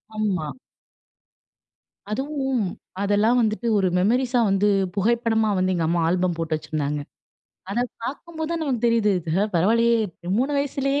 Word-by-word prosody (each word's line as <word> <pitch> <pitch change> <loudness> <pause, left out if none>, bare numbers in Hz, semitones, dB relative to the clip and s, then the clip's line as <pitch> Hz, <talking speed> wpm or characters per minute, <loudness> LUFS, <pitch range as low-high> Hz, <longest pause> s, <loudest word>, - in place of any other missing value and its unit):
ஆமா. 195 -7 -1 1.6
அதுவும் 265 +1 -1 0.4
அதெல்லாம் 210 +4 +3
வந்துட்டு 220 +1 0
ஒரு 190 -2 +2
மெமரிஸா 245 +6 +2
வந்து 195 +1 +2 0.3
புகைப்படமா 225 +1 +2
வந்து 185 0 +1
எங்க 165 -2 0
அம்மா 170 +1 +1
ஆல்பம் 180 -1 +1
போட்டு 165 -1 -1
வச்சிருந்தாங்க. 150 -1 -3 0.7
அத 235 - 0 0.2
பார்க்கும் 315 +7 -6
போது 315 0 -2
தான் 335 -1 -1
நமக்கு 250 -6 -1
தெரியுது, 230 -3 +3 0.4
பரவாயில்லையே 230 +7 +3 0.4
3 265 +5 +1
வயசுலயே 275 0 0
220 Hz, 125 wpm, -23 LUFS, 185-255 Hz, 1.6 s, அதெல்லாம்